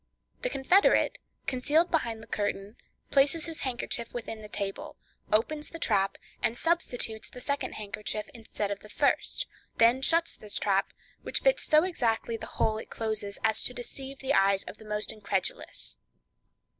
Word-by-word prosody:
The -, -, 0 dB
confederate, 360 Hz, -, +4 dB, 0.3 s
concealed 290 Hz, +6 st, +2 dB
behind 230 Hz, -9 st, 0 dB
the -, -, -12 dB
curtain, 205 Hz, 0 st, -2 dB, 0.4 s
passes 285 Hz, +4 st, +4 dB
his 330 Hz, -2 st, -5 dB
hand 255 Hz, -3 st, -2 dB, 0.3 s
within 225 Hz, -2 st, -5 dB
the 210 Hz, -, -9 dB
table, 195 Hz, -1 st, -4 dB, 0.3 s
opens 295 Hz, +8 st, +1 dB
the 330 Hz, -, -7 dB
trap, 195 Hz, -9 st, +1 dB, 0.2 s
and 235 Hz, -, +1 dB
substitutes 245 Hz, -10 st, 0 dB
the 250 Hz, -, -10 dB
second 280 Hz, +2 st, -2 dB
handkerchief 210 Hz, 0 st, -3 dB
instead 220 Hz, -3 st, -3 dB
of 200 Hz, -, -3 dB
the 210 Hz, -, -14 dB
first; -, -, +1 dB, 0.3 s
then 235 Hz, +3 st, +5 dB
shuts 330 Hz, +4 st, +3 dB
the 210 Hz, -, -13 dB
trap, 195 Hz, -1 st, +1 dB, 0.3 s
which -, -, -2 dB
fits -, -, +3 dB
so 305 Hz, +1 st, +6 dB
exactly 235 Hz, -10 st, 0 dB
the -, -, -6 dB
hole 220 Hz, 0 st, +2 dB
it -, -, -9 dB
closes 215 Hz, -3 st, -2 dB
as 220 Hz, -1 st, +3 dB
to 250 Hz, -, -3 dB
deceive 270 Hz, +2 st, -4 dB
the 270 Hz, +1 st, 0 dB
eyes 195 Hz, -4 st, +4 dB
of -, -, -9 dB
the 220 Hz, -, -12 dB
most 210 Hz, 0 st, -2 dB
incredulous. 195 Hz, -, -2 dB
230 Hz, 160 wpm, -29 LUFS, 210-280 Hz, 0.4 s, so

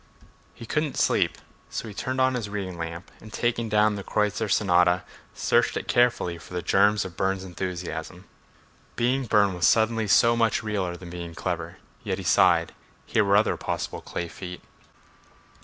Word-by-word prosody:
He 115 Hz, -, -10 dB
could 150 Hz, -, 0 dB
not 150 Hz, -3 st, -4 dB
sleep, -, -, +2 dB, 0.3 s
so -, -, -5 dB
he 105 Hz, -, -8 dB
turned 130 Hz, +5 st, -3 dB
on 130 Hz, 0 st, +3 dB
his 115 Hz, -5 st, -3 dB
reading 100 Hz, -3 st, -4 dB
lamp 85 Hz, +2 st, -6 dB
and, 110 Hz, -, -12 dB
taking 120 Hz, -1 st, -1 dB
down 105 Hz, 0 st, +3 dB
the 100 Hz, -1 st, -5 dB
"Kreutzer 105 Hz, +1 st, -1 dB
Sonata," 90 Hz, -2 st, +3 dB, 0.3 s
searched -, -, +2 dB
it -, -, -5 dB
carefully 120 Hz, -8 st, +2 dB
for 90 Hz, -, -11 dB
the 90 Hz, -, -2 dB
germs 100 Hz, +4 st, +3 dB
of 90 Hz, -2 st, -8 dB
Burne's 95 Hz, +1 st, -1 dB
enthusiasm. 90 Hz, -1 st, -5 dB, 0.7 s
Being 125 Hz, +2 st, 0 dB
Burne 100 Hz, -3 st, +3 dB
was 90 Hz, -1 st, +2 dB
suddenly 110 Hz, -1 st, +2 dB
so 115 Hz, +4 st, +5 dB
much 115 Hz, -1 st, +2 dB
realler 95 Hz, -5 st, -2 dB
than 90 Hz, -1 st, -10 dB
being 85 Hz, -1 st, -7 dB
clever. -, -, -4 dB, 0.3 s
Yet -, -, -2 dB
he -, -, -6 dB
sighed... -, -, +3 dB, 0.3 s
here 110 Hz, -, +2 dB
were 100 Hz, 0 st, +4 dB
other 105 Hz, -, +2 dB
possible -, -, -4 dB
clay 85 Hz, -, -5 dB
feet. 90 Hz, +1 st, -9 dB
100 Hz, 175 wpm, -25 LUFS, 90-115 Hz, 0.7 s, so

